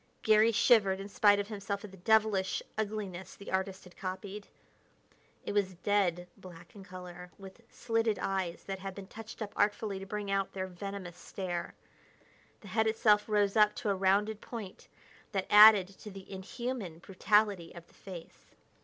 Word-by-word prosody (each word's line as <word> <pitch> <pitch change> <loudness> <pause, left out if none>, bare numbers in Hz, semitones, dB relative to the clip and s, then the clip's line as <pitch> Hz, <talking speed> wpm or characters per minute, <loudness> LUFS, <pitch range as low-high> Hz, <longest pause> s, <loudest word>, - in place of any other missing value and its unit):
Garry 220 0 +5
shivered 200 -4 +4
in 195 - -6
spite 205 0 +4
of 200 - -2
himself 200 -1 -4
at 205 - -11
the 190 - -13
devilish 210 0 +2
ugliness 200 -4 -4
the 200 - -10
artist 190 0 -2
had 180 -1 -16
copied. 195 +2 -6 1.0
It - - -3
was 195 -3 0
dead 180 -2 0
black 175 -2 -13
in 200 - -10
color, 180 -1 -10
with 195 +3 -12
slitted 225 -2 0
eyes 185 -3 -2
that 195 -1 -5
had 195 0 -6
been 200 - -8
touched 220 +2 -8
up 205 - -8
artfully 205 -1 0
to 195 - -9
bring 205 0 -4
out 195 -1 0
their 190 -1 -3
venomous 185 -1 -7
stare. 175 -3 -5 0.9
The 205 - -12
head 220 +3 +1
itself 215 -1 +3
rose 205 -1 +2
up 210 -1 +5
to 210 - -1
a - - +1
rounded 200 +3 +1
point 215 -6 -8 0.5
that 195 -2 -1
added 210 -2 +9
to 210 - -9
the 195 -1 -11
inhuman 200 -1 -5
brutality 195 0 +1
of 170 -1 -10
the - - -26
face. 180 -4 -12
195 Hz, 170 wpm, -31 LUFS, 185-210 Hz, 1.0 s, added